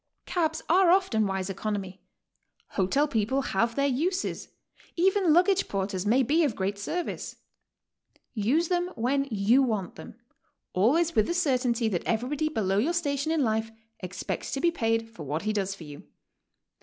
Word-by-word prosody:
Cabs 320 -3 -1
are 360 +2 +5
often 340 - +3
wise 190 -1 -2
economy, 195 -1 -4 0.7
hotel 240 +10 +1
people 260 +1 0
have 230 +2 0
their 280 - +1
uses, 330 +8 -1 0.5
even 375 0 +3
luggage 370 +4 +3
porters 195 0 -2
may 250 +5 +4
be 310 +7 +2
of 270 -8 0
great 195 +1 -2
service. 340 +12 -4 1.0
Use 255 +10 +1
them 355 -1 +1
when 275 +4 0
you 220 +4 +3
want 215 -8 -2
them, - - -10 0.6
always 310 - +2
with 215 - +3
the 345 - -1
certainty 250 -8 +1
that 185 -6 -1
everybody 270 +7 0
below 200 -8 0
your 240 - +1
own 340 - 0
station 285 -2 -1
in 320 -3 +2
life 220 -1 0 0.3
expects 185 0 -5
to 275 - -1
be 340 +4 +2
paid 225 -6 0
for 225 -7 -13
what 150 +4 -3
he 215 0 0
does 195 -2 -1
for 180 - -11
you. 145 -1 -10
240 Hz, 165 wpm, -27 LUFS, 200-315 Hz, 1.0 s, are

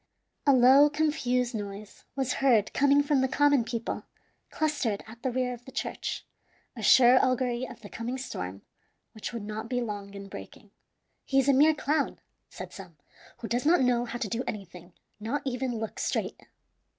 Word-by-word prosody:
A - - +8
low, 265 +3 +7
confused 280 -5 0
noise 205 -1 -7
was 265 -2 0
heard 235 -7 +3
coming 285 +1 +4
from 285 -2 +2
the 265 - +2
common 285 -1 +3
people 230 0 -4 0.4
clustered 285 -10 -1
at 225 +1 -13
the 260 - -1
rear 250 0 -1
of 240 0 -11
the 265 - -11
church, - - -4 0.5
a - - -7
sure 255 0 +6
augury 255 -1 0
of - - -12
the - - -9
coming 240 +3 -4
storm, 95 - -6 0.5
which 220 - -6
would 235 -3 -5
not 215 +2 -6
be 245 - 0
long 205 -4 -5
in 200 0 -8
breaking. 195 - -11 0.5
"He 270 - -1
is 270 0 +4
a 280 - +5
mere 300 +4 +5
clown," 295 0 -1 0.3
said - - -9
some, - - -11 0.4
"who 230 - -4
does 240 +2 -1
not 320 0 +4
know 245 -1 +2
how 240 - -5
to 240 -3 -3
do 230 +4 -2
anything, 180 -3 -7 0.3
not 230 +7 -3
even 250 -2 -2
look 220 -1 -5
straight." - - -3
245 Hz, 180 wpm, -28 LUFS, 220-270 Hz, 0.5 s, A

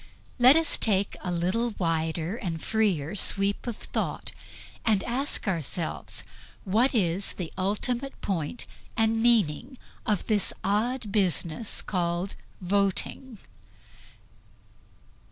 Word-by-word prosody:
Let 255 +3 +8
us 325 -1 +2
take 200 -2 +2
a 180 - -3
little 190 +7 0
wider 165 +1 -1
and 175 -8 -4
freer 190 -7 0
sweep 200 +2 +2
of 235 - -3
thought - - -3 0.5
and 210 -4 +2
ask 255 0 -1
ourselves 170 -2 -2 0.4
what 230 +7 +2
is 190 -2 +1
the 175 -4 -6
ultimate 240 +8 -2
point 180 +2 -3 0.3
and 225 0 +2
meaning 235 - +2 0.3
of 210 -4 +1
this 210 -3 +2
odd 215 +3 0
business 190 0 +1
called 175 0 -1 0.3
voting. 200 +6 0
200 Hz, 105 wpm, -27 LUFS, 175-230 Hz, 0.5 s, Let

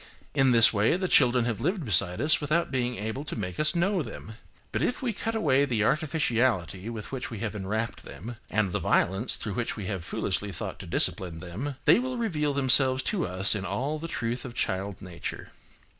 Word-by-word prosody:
In 135 -1 +4
this 115 -1 +7
way, 105 - +2
the 185 0 -1
children 125 -6 +4
have 115 -3 -2
lived 185 -5 -1
beside 90 -2 +4
us 155 +2 +3
without 155 +3 0
being 125 -2 -1
able 110 +6 -4
to 150 - -5
make 90 -5 -5
us 155 +1 +2
know 185 +2 +1
them. 110 -6 -8 0.4
But - - -1
if 250 - -1
we 240 -3 0
cut 225 +2 -3
away 140 -10 +3
the 120 -7 0
artificiality 120 - 0
with 110 -3 -7
which 130 -2 -4
we 115 - -6
have 110 -2 -2
enwrapped 105 +3 -3
them, 115 +6 -9
and 105 -3 +1
the - - -1
violence 95 +7 +1
through 105 - -4
which 120 +1 -2
we 105 - -6
have 95 -3 -4
foolishly 100 +3 -2
thought - - -5
to - - -8
discipline 85 -3 0
them, 100 - -5
they - - +6
will 255 0 -3
reveal 150 -11 -1
themselves 130 -1 +4
to 180 -6 0
us 95 +2 +3
in 105 -3 -3
all 135 +11 -2
the 165 - -5
truth 120 -5 -3
of 125 -2 -8
child 100 -2 -2
nature. 90 -2 -6
120 Hz, 205 wpm, -27 LUFS, 105-150 Hz, 0.4 s, this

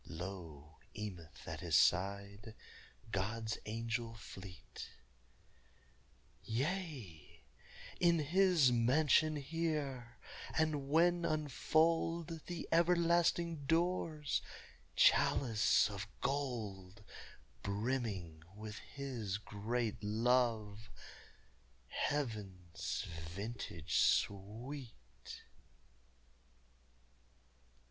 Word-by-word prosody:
Lo! 80 -4 -8 0.2
Emeth 90 -8 -7
at 80 - -4
his 85 -3 0
side, 100 +5 +2 0.6
God's 110 +3 -2
angel 115 +1 -2
fleet: 95 -5 -10 1.5
"Yea, 130 - -4 0.6
in 170 -1 +5
His 165 -2 +4
mansion 145 +6 +4
here; 145 -5 -2 0.4
and 150 -3 +1
when 175 +3 +4
unfold 160 +2 +1
The 175 -2 -5
everlasting 170 -2 +3
doors, 165 -2 +1 0.5
chalice 115 -5 +4
of 100 -1 -5
gold 105 -8 -3 0.6
Brimming 100 -6 -2
with 105 0 -7
His 125 -8 -4
great 110 +2 -3
love 110 -1 +1 1.0
heaven's 95 - -3
vintage 85 +1 -3
sweet!" 110 - -1
115 Hz, 65 wpm, -36 LUFS, 100-150 Hz, 1.5 s, in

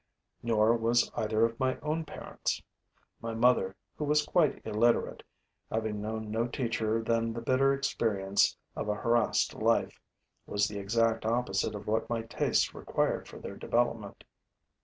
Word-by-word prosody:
Nor 115 0 +3
was 115 +1 +2
either 110 +1 +2
of 115 0 -4
my 130 -1 +1
own 155 +2 -2
parents. - - -4 0.6
My 115 0 -4
mother, 115 -5 +3 0.2
who - - -1
was 150 0 +2
quite 165 -5 +2
illiterate, 110 +2 +1 0.5
having 110 -2 -2
known 110 0 -4
no 115 +2 0
teacher 115 -3 -1
than 115 0 0
the 115 - -4
bitter 130 +3 +3
experience 105 -8 +1 0.2
of - - -3
a 105 - +1
harassed 115 0 +2
life, - - +1 0.5
was 105 0 +1
the 105 -1 -5
exact 115 +3 +1
opposite 110 -3 0
of 105 - -7
what 110 +2 0
my 115 -1 -1
tastes 115 - +1
required - - -1
for - - -11
their - - -7
development. 115 -4 -1
115 Hz, 150 wpm, -30 LUFS, 110-120 Hz, 0.6 s, Nor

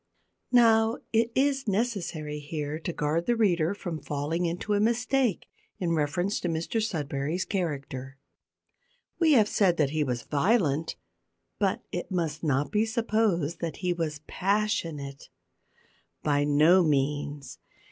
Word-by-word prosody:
Now, 225 -2 +5 0.2
it 230 +1 +2
is 275 -1 +1
necessary 190 -9 -2
here 150 0 -4
to 175 - -4
guard 160 +2 -1
the 240 - +3
reader 180 -5 +2
from 170 -6 -5
falling 150 +4 -2
into 175 +5 -2
a 205 - +2
mistake 240 0 +1 0.3
in 175 -2 -1
reference 165 +6 0
to - - -3
Mr 165 +7 -1
Sudberry's 155 -3 -2
character. 135 -8 -4 1.0
We 325 -3 +5
have 220 -6 +5
said 190 -5 +2
that 145 -3 +2
he 155 0 +1
was 125 -3 -2
violent, 160 - +1 0.6
but - - 0
it - - -4
must 165 -5 -2
not 145 -2 0
be 210 0 +2
supposed 215 -8 0
that 165 -3 -4
he 180 - +2
was 155 -4 -3
passionate. 175 -9 -2 0.9
By 145 -1 +2
no 155 +6 +5
means. 145 -2 -1
170 Hz, 135 wpm, -27 LUFS, 150-210 Hz, 1.0 s, Now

